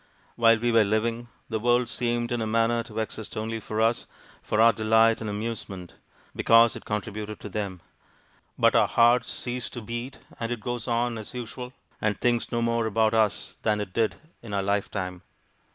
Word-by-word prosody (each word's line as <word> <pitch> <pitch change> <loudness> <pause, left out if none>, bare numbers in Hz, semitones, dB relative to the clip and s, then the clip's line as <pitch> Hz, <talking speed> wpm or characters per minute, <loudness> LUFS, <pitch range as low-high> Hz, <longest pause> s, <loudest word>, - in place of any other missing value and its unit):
While 115 -1 +5
we 120 +1 0
were 115 -1 +5
living, 115 +3 -1 0.2
the 110 -2 -2
world 120 +2 +2
seemed 120 +1 -1
in 120 -1 0
a 110 - -1
manner 115 +1 +2
to 110 -2 -11
exist 110 -1 -4
only 110 +1 -3
for 110 0 -4
us, 115 +1 +1 0.3
for 105 - -1
our 115 +1 +7
delight 110 +1 +3
and 110 - -3
amusement, 100 -4 -5 0.4
because 115 0 +5
it - - -9
contributed 105 0 -4
to 105 - -7
them. 100 -3 -4 0.8
But - - +4
our - - +5
hearts 120 0 +4
cease 125 -1 -3
to 120 - -7
beat, 120 +4 -5 0.2
and 115 0 -3
it 120 - -2
goes 120 +2 -4
on 120 -1 0
as 110 - -9
usual, 125 +1 -6 0.3
and 105 -2 0
thinks 120 -1 +1
no 115 0 0
more 115 -1 +1
about 110 +1 +2
us 110 -3 +1
than 105 -1 +1
it 100 -3 -5
did 115 -2 +1 0.3
in 105 -4 -6
our 100 - 0
lifetime. 95 -2 -2
115 Hz, 185 wpm, -26 LUFS, 105-120 Hz, 0.8 s, our